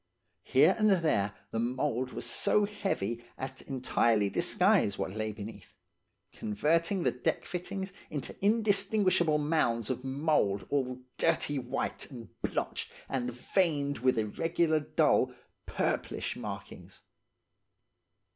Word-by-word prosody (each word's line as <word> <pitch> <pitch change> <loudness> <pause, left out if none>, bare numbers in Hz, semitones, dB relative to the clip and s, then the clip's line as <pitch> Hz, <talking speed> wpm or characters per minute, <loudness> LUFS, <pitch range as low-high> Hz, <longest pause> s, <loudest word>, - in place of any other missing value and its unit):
Here - - +5
and 215 0 +5
there 155 - +2 0.2
the 115 - -1
mould 125 +1 -1
was - - -5
so 210 - +2
heavy 120 - -2
as 130 0 -3
to 130 - -16
entirely 120 -6 +2
disguise 100 - +3
what - - -2
lay 110 0 -2
beneath, 105 -2 -9 0.6
converting 165 - +1
the - - +3
deck 125 - -1
fittings 190 +2 -4 0.2
into 145 -4 -5
indistinguishable 200 -6 +3
mounds 145 -7 +1
of 125 0 -4
mould 135 - +1
all 130 -3 -1 0.2
dirty 145 -1 +2
white 125 -1 -3
and 120 -4 -9
blotched - - -2 0.2
and 125 -2 -1
veined 145 +2 0
with 130 0 +2
irregular, 160 +8 +1
dull, 145 - +2 0.3
purplish - - -1
markings. - - -8
135 Hz, 120 wpm, -31 LUFS, 115-170 Hz, 0.6 s, Here